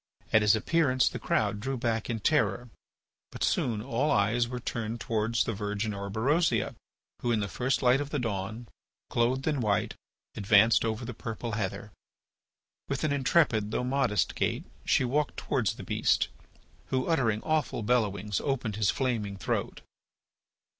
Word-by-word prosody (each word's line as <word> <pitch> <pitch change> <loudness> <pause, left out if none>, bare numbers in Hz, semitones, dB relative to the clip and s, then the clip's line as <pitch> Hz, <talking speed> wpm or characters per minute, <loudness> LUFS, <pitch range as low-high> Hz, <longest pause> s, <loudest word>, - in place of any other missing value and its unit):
At 110 - +6
his 105 0 +5
appearance 130 +1 +2
the 125 - -2
crowd 105 -2 0
drew 135 +4 -3
back 115 -2 -1
in 115 -2 -2
terror. 120 -4 +1 0.6
But - - -4
soon 110 -3 0
all 135 +4 0
eyes 115 +3 +2
were 125 0 -5
turned 115 -1 -4
towards 115 0 0
the 115 - -2
Virgin 105 +1 -2
Orberosia, 110 - 0 0.5
who, 120 - 0
in 115 - +2
the 100 - -1
first 130 +6 -1
light 125 +2 +4
of 145 - -4
the 145 - -2
dawn, 110 -1 -3 0.4
clothed 125 +3 +1
in 150 -4 0
white, 105 -3 0 0.4
advanced 105 +2 +5
over 115 +1 -2
the 120 - -5
purple 115 +1 -5
heather. 105 -1 -3 1.0
With 140 - -2
an 155 -2 +1
intrepid 130 -6 +2
though 115 - -1
modest 125 -7 +1
gait - - -1 0.2
she 130 - +3
walked 145 +4 0
towards - - 0
the - - -9
beast, - - +1 0.6
who, 130 -1 0
uttering 115 -10 +1
awful 155 -7 0
bellowings, 105 -3 0
opened 120 -7 -2
his 105 -2 +2
flaming 110 -7 -1
throat. - - -2
115 Hz, 155 wpm, -29 LUFS, 105-130 Hz, 1.0 s, At